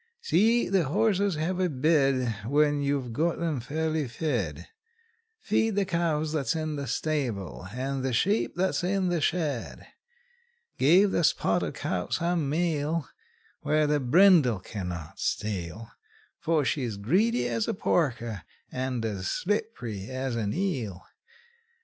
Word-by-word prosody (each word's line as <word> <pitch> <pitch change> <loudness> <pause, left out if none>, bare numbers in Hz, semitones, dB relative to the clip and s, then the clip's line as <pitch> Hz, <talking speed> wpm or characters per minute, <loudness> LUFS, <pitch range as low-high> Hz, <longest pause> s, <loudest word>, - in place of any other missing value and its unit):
See 240 - +3
the 190 -4 +2
horses 200 +3 +1
have 170 +4 -2
a 185 -1 +2
bed 135 -4 +2
When 145 +1 +2
you've 140 -4 -1
got 165 +7 0
'em 165 -5 -1
fairly 155 +3 -2
fed; 115 - -3 0.7
Feed 220 0 +1
the 200 -1 +2
cows 160 -4 0
that's 140 -5 0
in 155 -1 -2
the 140 -1 -4
stable, 115 - -2
and 130 +3 -3
the 130 - 0
sheep 200 - +1
that's 185 0 0
in 185 0 +1
the 175 -2 0
shed; 150 -6 -2 0.9
Give 185 +8 +5
the 170 - +1
spotted - - +1
cow 90 -1 -3
some 170 -4 0
meal, 160 -1 0 0.5
Where 155 +1 +2
the 150 0 +2
brindle 145 - +5
can 95 0 -6
not 85 -3 -7
steal; 105 +2 -3 0.5
For 160 -3 +1
she's 125 -7 -1
greedy 130 - +2
as 115 -2 -1
a - - -1
porker, 120 - 0 0.3
and 130 -2 -2
as 100 -4 -3
slipp'ry 150 - -2
as 130 -1 -3
an 105 -3 -1
eel. 130 - -2
145 Hz, 135 wpm, -27 LUFS, 120-170 Hz, 0.9 s, Give